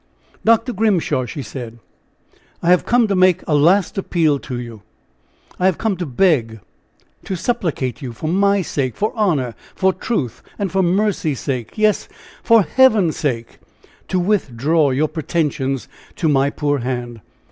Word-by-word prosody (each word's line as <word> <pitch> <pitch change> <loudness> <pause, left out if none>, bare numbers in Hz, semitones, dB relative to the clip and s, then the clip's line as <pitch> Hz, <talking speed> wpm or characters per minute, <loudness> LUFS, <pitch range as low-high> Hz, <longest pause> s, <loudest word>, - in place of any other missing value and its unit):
"Dr. 230 +2 +3
Grimshaw!" 190 - +1
she 140 +4 -6
said, 120 -4 -8 0.9
"I 170 - +3
have 180 - +3
come 240 -1 +3
to 200 - 0
make 185 -1 +3
a 155 - +1
last 175 +7 +3
appeal 160 -6 +1
to 125 -2 -6
you! 115 -3 -8 0.8
I 180 - +3
have 185 - +1
come 220 -3 0
to 175 -2 -4
beg, 125 - +1 0.6
to 190 - -4
supplicate 165 - -2
you, 130 -3 -5
for 120 +7 -6
my 200 +3 +2
sake, 135 -6 -2
for 215 - -1
honor, 155 - 0 0.2
for 190 0 +2
truth 150 - -3 0.2
and 200 -4 -2
for 195 - +2
mercy's 180 - 0
sake, 130 - -4
yes! 215 -1 +1 0.3
for 230 -3 +5
heaven's 215 -9 +3
sake, 120 -7 -3 0.5
to 185 - 0
withdraw 160 - +1
your 140 +4 +1
pretensions 150 -4 -2 0.3
to 165 - -1
my 140 -2 +3
poor 145 0 -1
hand. 120 -2 -4
160 Hz, 155 wpm, -19 LUFS, 130-195 Hz, 0.9 s, for